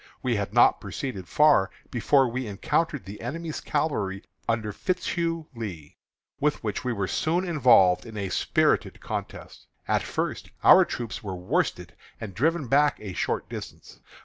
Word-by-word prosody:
We 125 -2 +1
had 100 -1 -2
not 120 +2 +5
proceeded 100 -2 -5
far 150 -11 +4 0.2
before 130 +3 +3
we 125 +1 -3
encountered 125 - -1
the 100 +2 -9
enemy's 160 +6 -5
cavalry 110 -11 -1 0.3
under 110 -2 -1
Fitzhugh 170 - -2
Lee, 90 -10 -7 0.4
with 150 -2 0
which 105 -2 -3
we 125 - -1
were 100 -4 -2
soon 170 - 0
involved 120 - +5
in 110 -1 -9
a 100 -2 -3
spirited - - +1
contest. - - -7 0.2
At - - +2
first - - -3
our - - +8
troopers 115 -1 -5
were 100 -4 -5
worsted 90 0 -1 0.3
and 105 -4 -7
driven 150 - 0
back 145 +3 +3
a 100 -3 -7
short - - -2
distance. - - -9
115 Hz, 150 wpm, -26 LUFS, 100-150 Hz, 0.4 s, our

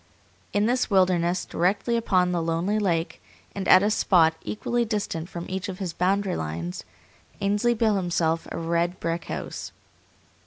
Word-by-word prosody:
In 205 +1 +2
this 250 +2 +1
wilderness, 185 -2 +2
directly 200 +7 0
upon 185 -6 +2
the 175 -1 0
lonely 165 +6 0
lake, 170 -5 -1 0.3
and 195 -1 -4
at 185 - +7
a 210 - +2
spot 165 -6 +4
equally 240 +3 -1
distant 205 -7 -3
from 170 -2 -6
each 190 +1 -4
of 185 - -5
his 185 -4 -4
boundary 190 +2 +1
lines, 85 +3 -4 0.6
Ainsley 205 +4 +1
built 220 -2 +2
himself 170 -3 0
a - - -4
red 170 +2 -1
brick 165 +1 -2
house. - - -6
185 Hz, 155 wpm, -25 LUFS, 170-205 Hz, 0.6 s, at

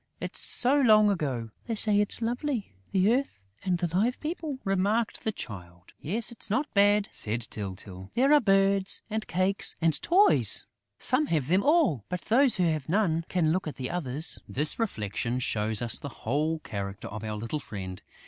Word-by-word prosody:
It's - - -5
so 250 +2 +2
long 215 -4 +5
ago!" 130 - -3 0.2
"They 230 - -2
say 210 -1 +7
it's 210 +3 0
lovely, 240 - -3 0.2
the 195 +4 +3
earth 270 - -2 0.3
and 180 -2 0
the 175 -1 -3
Live 230 +7 0
People!" 310 -3 -5
remarked 200 +3 -1
the 220 - -1
Child. 90 - -10
"Yes, 220 +9 +2
it's 235 - -6
not 270 +9 -1
bad," 205 0 +3
said 115 +3 0
Tyltyl. 95 -2 -7
"There 270 +4 +3
are 300 - +7
birds 195 -1 +1
and 220 0 -3
cakes 185 +2 +1
and 160 -3 +1
toys.... 335 - +5 0.3
Some 265 - +1
have 150 -4 -1
them 185 +3 +3
all; 280 - +2
but 180 -1 -4
those 255 +3 +2
who 185 - 0
have 155 -5 -1
none 165 -4 0
can 165 -4 +1
look 185 0 -2
at 150 - -6
the 130 -1 -5
others!" 155 -3 -2
This 150 - -2
reflection 120 - -3
shows 110 -2 0
us 120 - +2
the 140 - -7 0.2
whole 150 +7 0
character 100 -8 -7
of 110 +1 -8
our 110 -1 -4
little 115 +8 -4
friend. 95 -8 -8
180 Hz, 180 wpm, -27 LUFS, -, 0.3 s, say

